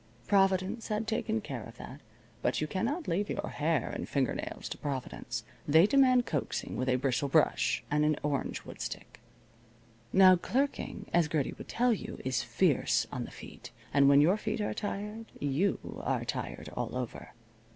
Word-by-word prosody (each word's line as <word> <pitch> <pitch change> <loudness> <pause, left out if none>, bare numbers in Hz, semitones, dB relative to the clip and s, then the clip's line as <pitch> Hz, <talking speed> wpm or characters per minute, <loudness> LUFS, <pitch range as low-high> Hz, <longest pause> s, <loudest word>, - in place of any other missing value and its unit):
Providence 195 - +2
had 215 0 -1
taken 220 0 -1
care 135 - -5
of 115 +1 -12
that. 140 +3 -9 0.4
But 125 - +1
you 155 - 0
cannot 230 - -2
leave 195 +4 0
your - - -3
hair 155 -2 0
and - - -5
finger 135 -4 +1
nails - - -5
to - - -5
Providence. 125 -4 -4 0.2
They 160 +4 +7
demand 255 0 +5
coaxing 145 -5 -3
with 130 +1 -1
a 125 - +4
bristle 135 +2 0
brush - - +2
and 150 0 +3
an 150 0 +3
orangewood 145 -2 -3
stick. - - -6 0.9
Now 185 -1 +7
clerking, 270 +10 -2
as 170 -2 +4
Gertie 150 -3 -1
would - - -10
tell 245 0 +3
you, 210 - -6
is 130 -3 +1
fierce 125 -10 +2
on 125 -1 -3
the - - -9
feet. - - -11 0.2
And 140 -1 +6
when 140 0 +7
your 175 +7 +4
feet 215 +1 -3
are 210 - -1
tired 210 +2 -4
you 145 +8 +1 0.3
are - - -1
tired - - -4
all - - -4
over. 125 -2 -6
165 Hz, 170 wpm, -31 LUFS, 140-210 Hz, 0.9 s, They